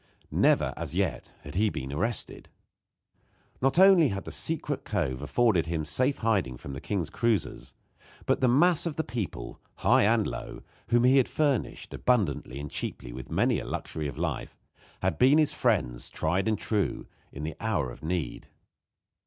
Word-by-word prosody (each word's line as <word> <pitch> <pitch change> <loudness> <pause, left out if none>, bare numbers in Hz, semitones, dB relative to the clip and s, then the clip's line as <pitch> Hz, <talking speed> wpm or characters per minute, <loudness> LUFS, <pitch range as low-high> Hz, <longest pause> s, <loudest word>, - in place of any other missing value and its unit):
Never, - - +3
as - - -5
yet, - - -2
had 70 - -9
he 105 +4 +2
been 65 -6 -5
arrested. 110 +10 -3 1.1
Not 135 +4 +2
only 190 -4 +7
had 100 -5 -3
the - - -7
secret 155 -3 -2
cove 70 -11 -2
afforded 90 +1 +2
him 80 -2 -2
safe 130 - +1
hiding 95 - +1
from 70 - -8
the 65 - -7
king's 90 -7 -2
cruisers, 115 -7 -1 0.5
but - - +1
the 130 - +4
mass 165 +7 +4
of 155 - -3
the 160 - -1
people, 115 - -5
high - - +4
and 110 0 +3
low, - - -6 0.2
whom 120 0 +3
he 130 +2 +5
had 130 - +4
furnished 145 -6 -1
abundantly 90 - 0
and 70 0 -6
cheaply - - -5
with 65 0 -8
many - - +2
a - - -7
luxury 75 -2 -4
of 70 - -7
life, - - -3 0.5
had - - 0
been 135 +4 +6
his 155 -2 +3
friends, 65 - 0
tried 90 +5 -1
and 110 -1 +1
true, 105 0 -1 0.3
in 70 - -7
the 80 -1 -4
hour 65 - -1
of - - -12
need. 85 0 -3
105 Hz, 170 wpm, -28 LUFS, 75-125 Hz, 1.1 s, only